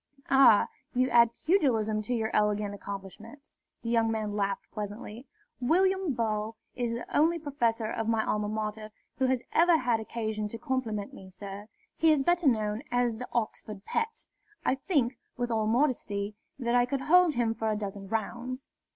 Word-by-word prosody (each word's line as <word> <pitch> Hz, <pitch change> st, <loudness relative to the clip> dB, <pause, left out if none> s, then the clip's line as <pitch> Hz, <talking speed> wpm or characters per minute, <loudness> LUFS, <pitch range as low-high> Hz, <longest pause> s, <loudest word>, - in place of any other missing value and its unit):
"Ah, 265 Hz, -6 st, +7 dB, 0.3 s
you 255 Hz, +1 st, +3 dB
add 235 Hz, -1 st, +7 dB, 0.2 s
pugilism 230 Hz, -, +2 dB
to 245 Hz, +4 st, -2 dB
your 220 Hz, -1 st, -1 dB
elegant 210 Hz, -1 st, +1 dB
accomplishments?" 205 Hz, +8 st, -9 dB, 0.3 s
The 230 Hz, -, -2 dB
young 230 Hz, -1 st, +3 dB
man 215 Hz, -2 st, -2 dB
laughed 200 Hz, -1 st, -1 dB
pleasantly. 210 Hz, +3 st, -7 dB, 0.3 s
"William 370 Hz, +5 st, +2 dB
Ball 220 Hz, -1 st, -1 dB, 0.2 s
is 240 Hz, -2 st, -1 dB
the 235 Hz, -, -6 dB
only 325 Hz, +3 st, +4 dB
professor 245 Hz, -7 st, -1 dB
of 225 Hz, 0 st, -2 dB
my 225 Hz, -1 st, +1 dB
Alma 210 Hz, 0 st, 0 dB
Mater 215 Hz, 0 st, -3 dB, 0.3 s
who 260 Hz, -, +3 dB
has 255 Hz, -1 st, 0 dB
ever 340 Hz, 0 st, +5 dB
had 245 Hz, -5 st, +1 dB
occasion 220 Hz, -1 st, -3 dB
to 230 Hz, -, -6 dB
compliment 230 Hz, -7 st, -2 dB
me, 190 Hz, -, -11 dB
sir. 195 Hz, +2 st, -8 dB, 0.3 s
He 320 Hz, 0 st, +5 dB
is 290 Hz, -3 st, +3 dB
better 345 Hz, 0 st, +2 dB
known 215 Hz, -3 st, +1 dB
as 245 Hz, -2 st, +1 dB
the 250 Hz, -, -7 dB
Oxford 215 Hz, -3 st, -3 dB
Pet. 455 Hz, 0 st, -2 dB, 0.4 s
I -, -, +3 dB
think, 265 Hz, -4 st, 0 dB, 0.2 s
with 245 Hz, 0 st, -1 dB
all 220 Hz, -1 st, +1 dB
modesty, 220 Hz, -5 st, 0 dB, 0.2 s
that 240 Hz, -3 st, -1 dB
I 245 Hz, 0 st, +4 dB
could 270 Hz, +1 st, -2 dB
hold 345 Hz, +1 st, +5 dB
him 235 Hz, -2 st, +1 dB
for 225 Hz, 0 st, -2 dB
a 215 Hz, -, +1 dB
dozen 200 Hz, -1 st, -5 dB
rounds. 240 Hz, +5 st, -4 dB
230 Hz, 170 wpm, -29 LUFS, 215-260 Hz, 0.4 s, Ah